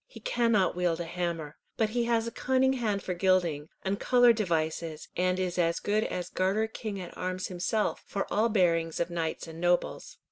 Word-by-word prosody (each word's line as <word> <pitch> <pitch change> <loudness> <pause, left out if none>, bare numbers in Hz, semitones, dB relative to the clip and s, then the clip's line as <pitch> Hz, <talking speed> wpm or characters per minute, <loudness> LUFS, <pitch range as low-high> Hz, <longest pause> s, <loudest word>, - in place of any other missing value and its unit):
He - - -12
cannot 230 - +2
wield 175 -2 0
a 170 - -3
hammer, 165 -3 -3 0.2
but 220 -1 +2
he 240 +1 0
has 230 -1 +1
a 230 - -4
cunning 260 +2 +2
hand 215 -6 -1
for 180 - -2
gilding, 175 -5 +1
and 195 +1 -1
coloured 245 -2 +5
devices, 160 -5 -2
and 180 +1 +1
is 180 -1 -1
as 170 -1 +2
good 210 +1 +1
as 180 -1 -3
Garter 195 +4 +1
king 215 -2 -5
at 180 -2 -8
arms 185 0 -3
himself 185 +4 -1
for 200 -1 -2
all 220 +3 +3
bearings 170 -6 +2
of 170 +1 -1
knights 165 -2 -2
and 165 0 -9
nobles." 175 - 0
185 Hz, 190 wpm, -29 LUFS, 170-220 Hz, 0.2 s, coloured